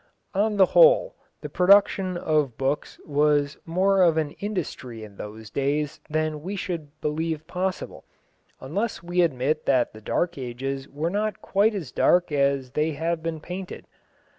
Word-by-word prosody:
On 210 +2 +1
the 190 - +7
whole, - - +5 0.3
the - - -5
production 185 -1 +4
of 150 -8 0
books 135 +2 -2
was 145 -1 +1
more 190 +3 +3
of 170 -3 +4
an 155 -2 0
industry 150 - -5
in 100 -2 -12
those 105 0 -9
days 145 +3 -1
than 155 -1 -1
we 190 +6 -4
should 160 -6 -5
believe 155 +1 -2
possible, 180 +2 -4 0.6
unless 195 - -3
we 175 +1 +1
admit 150 -1 0
that 130 -3 +2
the 110 - -12
Dark 170 +8 -1
Ages 135 +2 -4
were 155 +4 -2
not 210 +2 -2
quite 210 +2 +2
as 165 -10 -5
dark 175 -2 +3
as 140 -2 +1
they 155 +3 0
have 165 +2 -2
been 165 -1 -3
painted. 180 +4 -7
155 Hz, 155 wpm, -25 LUFS, 140-185 Hz, 0.6 s, the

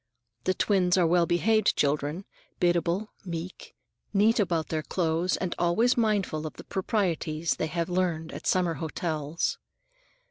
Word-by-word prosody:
The 185 - +2
twins 185 -3 +2
are 180 - +4
well 170 0 +3
behaved 215 +5 +3
children, 150 +5 0 0.3
biddable, 175 +4 +1
meek, 175 0 -7 0.4
neat 220 +4 +4
about 170 -6 0
their 155 -1 -1
clothes, 165 +2 0
and 185 -3 -2
always 215 +9 +3
mindful 205 -9 0
of 155 - -8
the - - -11
proprieties 170 -6 -1
they 160 - -1
have 170 +1 -2
learned 175 -3 -1
at - - -7
summer 180 -2 +2
hotels. 155 0 -2
175 Hz, 140 wpm, -27 LUFS, 160-190 Hz, 0.4 s, are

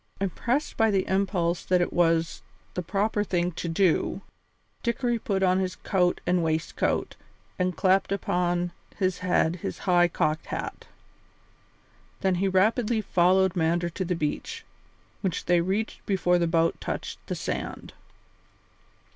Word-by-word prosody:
Impressed 235 - -1
by 225 -1 +4
the 195 -2 +1
impulse 185 -3 0
that 180 -1 +2
it 175 - 0
was 165 -1 +2 0.3
the 180 - -2
proper 205 +4 0
thing 175 -3 0
to 170 0 -4
do, 170 0 +1 0.6
Dickory 240 0 0
put 195 -3 -1
on 185 0 +3
his 185 -1 -2
coat 180 -2 0
and 180 -1 +2
waistcoat 160 0 -1 0.4
and 180 -2 0
clapped 190 +1 +3
upon 175 -2 0 0.3
his 185 -2 0
head 180 -2 +1
his - - -5
high 175 -2 +5
cocked 155 -1 -1
hat. - - -5 1.3
Then 190 -1 +2
he 195 - +2
rapidly 215 +4 +2
followed 185 -1 +3
Mander 170 +1 +1
to 185 - -3
the 180 0 -1
beach, 310 - -3 0.6
which 190 -5 -2
they 175 -1 +4
reached 195 +5 -2
before 180 -3 +2
the 170 - +2
boat 165 0 +1
touched - - -4
the - - -2
sand. - - -5
180 Hz, 140 wpm, -26 LUFS, 175-195 Hz, 1.3 s, high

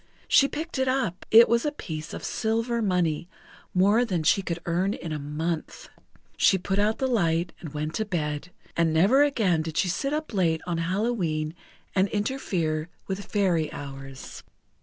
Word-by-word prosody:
She 275 - +6
picked 310 0 -5
it 260 - +1
up; 255 -9 -1
it 230 +1 +8
was 235 +1 +2
a 295 - 0
piece 160 - -6
of - - -7
silver 230 +2 -1
money, 175 -5 0 0.4
more 205 +6 +4
than 185 -9 -1
she 180 +5 +4
could 170 -3 -3
earn 180 +4 0
in 165 -1 -7
a 155 - -2
month. 155 +3 -4 0.5
She 190 - +4
put 195 +2 -1
out 210 +2 +2
the 265 - -1
light, 170 -8 +1
and 160 - -8
went 150 +1 -3
to 220 - -1
bed; 155 -4 -3 0.3
and 165 -1 +2
never 205 - +5
again 220 - +2
did 160 0 -5
she 185 - +2
sit 275 +10 -1
up 305 -3 -3
late 165 -5 +1
on 170 -2 -2
Hallowe'en 170 -4 -1 0.4
and 190 0 +3
interfere 180 -8 -1 0.2
with 195 +1 -4
Fairy 175 -7 +1
hours. 135 -1 -8
180 Hz, 175 wpm, -26 LUFS, 160-220 Hz, 0.5 s, it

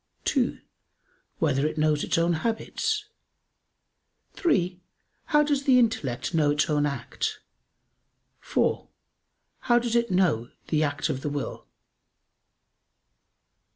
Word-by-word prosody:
(2) - - +1 0.8
Whether 135 +3 +1
it 155 - -5
knows 155 -1 +2
its - - 0
own 170 +1 +2
habits? 420 - -1 1.3
(3) 180 - 0 0.4
How 295 0 +4
does 285 -2 0
the 260 -2 +6
intellect 220 - 0
know 155 -3 +3
its 150 +2 +2
own 150 -1 +2
act? 140 - -3 1.0
(4) - - 0 0.7
How 240 -2 +3
does 240 -1 0
it 235 0 +2
know 170 -11 +2 0.2
the 155 -1 +2
act 145 -2 0
of 130 - -2
the 150 - -2
will? 145 -1 -5
170 Hz, 115 wpm, -26 LUFS, 145-240 Hz, 1.3 s, the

